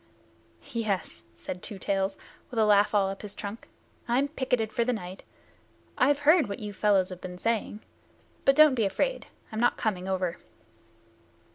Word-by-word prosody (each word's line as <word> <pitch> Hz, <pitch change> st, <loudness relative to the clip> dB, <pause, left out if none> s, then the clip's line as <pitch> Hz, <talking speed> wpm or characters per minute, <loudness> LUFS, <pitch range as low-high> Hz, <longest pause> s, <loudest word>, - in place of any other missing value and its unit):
"Yes," 200 Hz, -, -3 dB
said 180 Hz, +10 st, -7 dB
Two 205 Hz, -, -8 dB
Tails, 195 Hz, 0 st, -1 dB, 0.3 s
with 245 Hz, -, -8 dB
a 220 Hz, -, +4 dB
laugh 210 Hz, 0 st, +4 dB
all 200 Hz, -2 st, +4 dB
up 195 Hz, -, -6 dB
his 205 Hz, -1 st, -8 dB
trunk. 205 Hz, +2 st, -7 dB, 0.4 s
"I'm 260 Hz, +4 st, +2 dB
picketed 250 Hz, -6 st, -1 dB
for 235 Hz, -, +2 dB
the 250 Hz, -, 0 dB
night. 185 Hz, -4 st, -6 dB, 0.7 s
I've 285 Hz, +3 st, +3 dB
heard 310 Hz, -, +5 dB
what 200 Hz, -, -4 dB
you 210 Hz, -1 st, -6 dB
fellows 195 Hz, -2 st, +2 dB
have 185 Hz, -1 st, -8 dB
been 180 Hz, -1 st, -7 dB
saying. 220 Hz, 0 st, -1 dB, 0.6 s
But 275 Hz, -, +5 dB
don't 305 Hz, -1 st, +7 dB
be 230 Hz, -4 st, +1 dB
afraid. -, -, -1 dB, 0.2 s
I'm 220 Hz, -, -4 dB
not 240 Hz, -, +3 dB
coming 190 Hz, -5 st, -2 dB
over." 185 Hz, -2 st, -1 dB
210 Hz, 165 wpm, -28 LUFS, 190-240 Hz, 0.7 s, don't